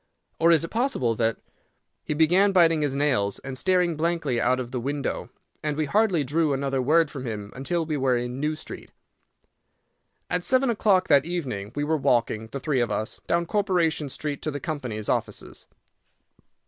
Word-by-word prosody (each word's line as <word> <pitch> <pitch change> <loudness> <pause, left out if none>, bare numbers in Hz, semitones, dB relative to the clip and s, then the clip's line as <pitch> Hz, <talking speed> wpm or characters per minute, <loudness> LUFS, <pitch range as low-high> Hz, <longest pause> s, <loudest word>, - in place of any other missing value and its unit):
or 165 +1 +5
is 165 -2 +4
it 165 - -4
possible 225 - 0
that—" 115 0 0 0.7
He 150 - -3
began 180 +6 +4
biting 165 -4 +4
his 145 -2 0
nails 130 -9 +1
and 135 -1 -6
staring 180 +2 +2
blankly 155 -6 0
out 130 0 +2
of 125 -1 -5
the 125 - -2
window, 140 +3 -3 0.3
and 150 -1 -2
we 155 - +1
hardly 190 -1 +2
drew 150 +2 +1
another 135 -1 -1
word 155 +4 +3
from 135 - -6
him 105 -2 -5
until 165 +6 -1
we 155 -2 -2
were 130 -2 +2
in 125 +2 -4
New 150 +2 0
Street. 155 - -9 1.4
At 180 0 -1
seven 260 +2 +3
o'clock 200 -4 +2
that 140 -2 +5
evening 130 - -4
we 145 - -1
were 155 +2 +1
walking, 115 -5 +1
the 140 +5 -6
three 140 -1 0
of 120 - +1
us, 105 +2 -3
down 170 0 +1
Corporation 170 -7 0
Street 145 +1 -4
to 155 - -2
the 145 -1 -4
company's 125 -9 -4
offices. - - -3
150 Hz, 180 wpm, -25 LUFS, 130-170 Hz, 1.4 s, or